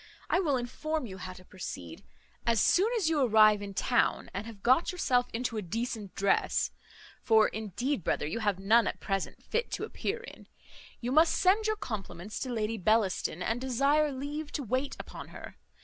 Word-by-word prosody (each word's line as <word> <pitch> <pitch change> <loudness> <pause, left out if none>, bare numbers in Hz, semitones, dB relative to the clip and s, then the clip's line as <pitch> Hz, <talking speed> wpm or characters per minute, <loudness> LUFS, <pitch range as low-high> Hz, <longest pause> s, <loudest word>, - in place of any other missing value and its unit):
I - - +4
will 295 -8 +2
inform 285 +5 -3
you 190 -4 -8
how 185 0 -6
to 185 0 -15
proceed. 130 - -8 0.4
As 230 -2 +3
soon 390 - +4
as 390 -8 +1
you 320 -3 +2
arrive 215 -4 +6
in 200 -1 -7
town, 240 +4 +1
and 200 +4 -4
have 215 -4 -11
got 260 +7 +4
yourself 250 -9 +1
into 230 0 -2
a - - -1
decent 215 +1 -4
dress 195 0 +1 0.5
(for 220 -2 +5
indeed, 220 - -3
brother, - - 0
you 160 +9 -3
have 205 -4 +1
none 220 +5 +4
at - - -3
present 195 -2 -3
fit 475 +1 -1
to - - -2
appear 465 +4 -3
in), 475 - -12 0.5
you 245 +1 -2
must 315 +4 +5
send 410 +4 +3
your 435 - +1
compliments 200 - -6
to 260 - -3
Lady 225 -1 -1
Bellaston, 190 -3 +1
and 230 +2 -1
desire 280 +4 +2
leave 290 +3 -5
to 285 - -2
wait 255 +4 -2 0.2
on - - -8
her. - - -10
235 Hz, 185 wpm, -30 LUFS, 205-285 Hz, 0.5 s, arrive